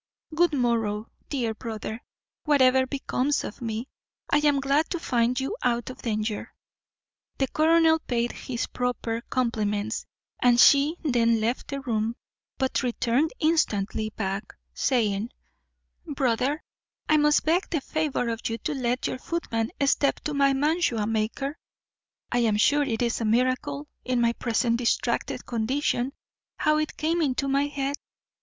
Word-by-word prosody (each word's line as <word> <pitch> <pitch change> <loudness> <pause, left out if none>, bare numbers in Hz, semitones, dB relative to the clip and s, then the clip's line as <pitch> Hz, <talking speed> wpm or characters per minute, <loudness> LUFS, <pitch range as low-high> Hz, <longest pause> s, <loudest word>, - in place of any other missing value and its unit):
Good 340 0 +3
morrow, 230 -5 0 0.2
dear 240 -6 -1
brother; 220 +1 -6 0.4
whatever 260 -3 +4
becomes 280 +1 -1
of 210 - -7
me, 225 +1 -3 0.4
I - - +5
am 295 -2 +3
glad 280 +3 +1
to 345 - -2
find 245 -4 +1
you 270 +11 -2
out 240 0 0
of - - -12
danger." 215 -2 -3 0.8
The 270 - +1
colonel 320 +1 +4
paid 240 -5 -1
her - - -12
his 240 -3 -3
proper 240 -2 -2
compliments, 220 -3 -1 0.3
and 245 -1 +5
she 285 +4 +6
then 230 -5 +3
left 230 +3 -1
the 275 -1 -4
room, 225 -3 -1 0.4
but 265 -1 0
returned 250 +4 +1
instantly 215 -9 +1
back, 195 -1 -3 0.2
saying, 220 -4 +1 0.8
"Brother, 275 0 0 0.4
I 310 - +4
must 295 0 +3
beg 340 +5 +2
the 325 - 0
favour 295 -5 -1
of 230 0 -3
you 225 - -2
to 310 +5 -3
let 250 -2 -1
your 255 - -2
footman 230 -9 -2
step 275 0 +2
to 300 - -3
my 280 -1 +4
mantua 285 -6 +1
maker; 225 +7 -2 0.7
I 245 - +2
am 220 -3 +2
sure 290 +7 +4
it 245 -4 0
is 235 0 0
a - - 0
miracle, 220 - 0 0.2
in 255 -1 0
my 235 0 +3
present 235 0 0
distracted 240 -1 -1
condition, 245 +2 0 0.5
how 305 -1 +2
it 310 0 -2
came 330 +2 0
into 275 -2 0
my 275 +1 +2
head." 280 0 -2
250 Hz, 150 wpm, -26 LUFS, 230-290 Hz, 0.8 s, she